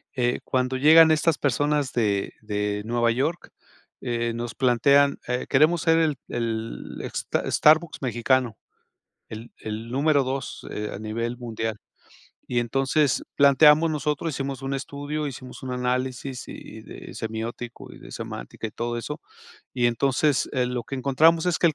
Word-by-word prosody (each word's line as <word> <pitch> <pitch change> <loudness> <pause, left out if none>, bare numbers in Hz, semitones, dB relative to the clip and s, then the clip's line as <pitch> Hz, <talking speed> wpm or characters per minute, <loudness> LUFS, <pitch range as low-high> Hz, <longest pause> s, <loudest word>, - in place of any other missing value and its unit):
eh, 125 -1 +1
cuando 130 0 0
llegan 160 +4 +7
estas 155 0 +2
personas 145 0 0
de 105 -5 0
de 105 -1 -2
Nueva 120 0 +1
York, 145 +9 -2 0.5
eh, 120 -1 -2
nos 120 0 -5
plantean, 140 +3 +4
eh: 125 +1 -2
"Queremos 155 +4 +4
ser 165 +1 +3
el 155 -4 +1
el 115 -1 -4
sta - - -2
Starbucks 155 +2 +4
mexicano, 125 -1 +1 0.7
el 115 +2 -8
el 110 +2 -6
número 140 +3 +2
2, 130 0 -4
eh, 105 0 -4
a - - -7
nivel 115 +3 -3
mundial", 110 -3 -4 0.7
y 120 - +2
entonces 135 +3 +1
planteamos, 150 +3 +6
nosotros 150 +1 -1
hicimos 135 -1 -4
un 135 +1 -2
estudio, 145 +2 -4
hicimos 130 -1 -10
un 130 - -5
análisis, 125 +1 -2
y - - -10
de - - -11
semiótico, 115 +2 -6
y - - -12
de - - -12
semántica - - -6
y - - -7
todo 120 0 -3
eso, 150 +5 -6 0.5
y 120 -2 +2
entonces, 135 +4 +1
eh, 125 -2 +1
lo 125 -1 -3
que 135 - -5
encontramos 160 +6 +3
es 175 -2 +1
que - - +4
el 155 - -2
130 Hz, 155 wpm, -25 LUFS, 120-145 Hz, 0.7 s, llegan